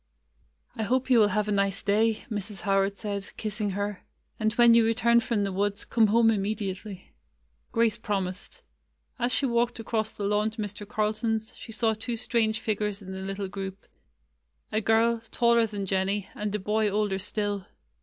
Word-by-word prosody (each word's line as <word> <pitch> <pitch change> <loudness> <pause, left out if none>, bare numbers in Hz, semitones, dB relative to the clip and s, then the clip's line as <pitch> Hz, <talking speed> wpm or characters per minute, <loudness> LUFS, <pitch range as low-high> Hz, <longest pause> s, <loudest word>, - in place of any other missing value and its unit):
'T 225 - -2
hope 255 +4 0
you 245 - +7
will 210 - +6
have 210 +1 0
a - - -1
nice 200 -1 +1
day," 215 +2 +2
Mrs. 205 -2 -4
Howard 195 0 +1
said, 200 -1 -4
kissing 210 -1 -2
her. 205 0 -3 0.4
"And 220 -1 +2
when 235 0 +6
you 230 0 +6
return 235 +1 +4
from 225 -3 0
the 200 - -1
woods, 205 +2 -1
come 225 -2 +3
home 225 +2 +4
immediately." 200 -2 -3 0.6
Grace 230 -1 +2
promised. 195 -3 -4 0.6
As 245 0 +1
she 240 +4 +2
walked 235 -1 +1
across 220 -1 -1
the 210 - -7
lawn 210 +2 +2
to 220 0 -6
Mr. 205 0 -7
Carlton's, 220 +1 -1
she 225 - -10
saw 220 0 +1
two 230 +2 -4
strange 220 -2 +1
figures 210 -2 -1
in 190 - -8
the 190 0 -5
little 195 +1 -4
group 195 0 -6 0.4
— - - -42
a 215 0 +1
girl, 225 +2 +3
taller 235 -1 +3
than 205 -2 -4
Jennie, 195 +1 0
and 210 0 -3
a - - +2
boy 210 +2 +1
older 205 -1 0
still. 205 -1 -2
210 Hz, 180 wpm, -27 LUFS, 200-225 Hz, 0.6 s, you